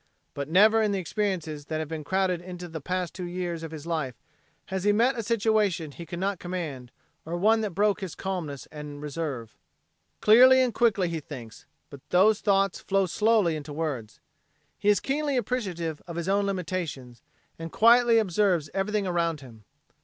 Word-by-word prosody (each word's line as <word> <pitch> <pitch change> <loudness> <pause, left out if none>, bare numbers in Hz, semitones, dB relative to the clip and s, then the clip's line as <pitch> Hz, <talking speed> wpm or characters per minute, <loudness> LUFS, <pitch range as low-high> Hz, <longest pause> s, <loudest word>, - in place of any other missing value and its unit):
But 140 0 -5
never 215 +6 +5
in 215 -1 +1
the - - 0
experiences 175 -6 -3
that 155 - -3
have 155 -1 -3
been 160 0 -5
crowded 185 +2 0
into 180 0 -8
the 160 -2 -7
past 180 +2 -3
two 180 -2 -5
years 175 -2 -4
of 165 - -6
his 155 -1 -9
life 155 -7 -2 0.6
has 190 -1 -2
he 205 - +4
met 235 +6 +3
a 230 - -2
situation 210 -7 +1
he 170 +4 -10
could 175 - -6
not 195 0 -1
command, 160 -9 -5 0.3
or 170 +2 -4
one 220 +5 +3
that 205 -6 -3
broke 205 0 +2
his 190 -4 -5
calmness 165 -9 -5
and 150 -1 -8
reserve. 145 -6 -5 0.6
Clearly 255 +4 +7
and 255 -3 +2
quickly 205 -6 +2
he 165 -1 -3
thinks, 115 -6 -10 0.2
but 140 - -10
those 205 +4 +4
thoughts 195 -2 +2
flow 195 0 +1
slowly 210 -2 +2
into 150 -1 -7
words. 140 -9 -4 0.6
He 205 - 0
is 205 - +4
keenly 285 0 -1
appreciative 185 -10 -2
of 170 - -7
his 170 +1 -3
own 200 +1 +2
limitations 165 - -4 0.4
and 165 0 -6
quietly 235 +1 +5
he - - +6
observes 185 -5 +1
everything 205 +1 -1
around 170 -4 -1
him. 115 -5 -14
180 Hz, 185 wpm, -27 LUFS, 155-205 Hz, 0.6 s, Clearly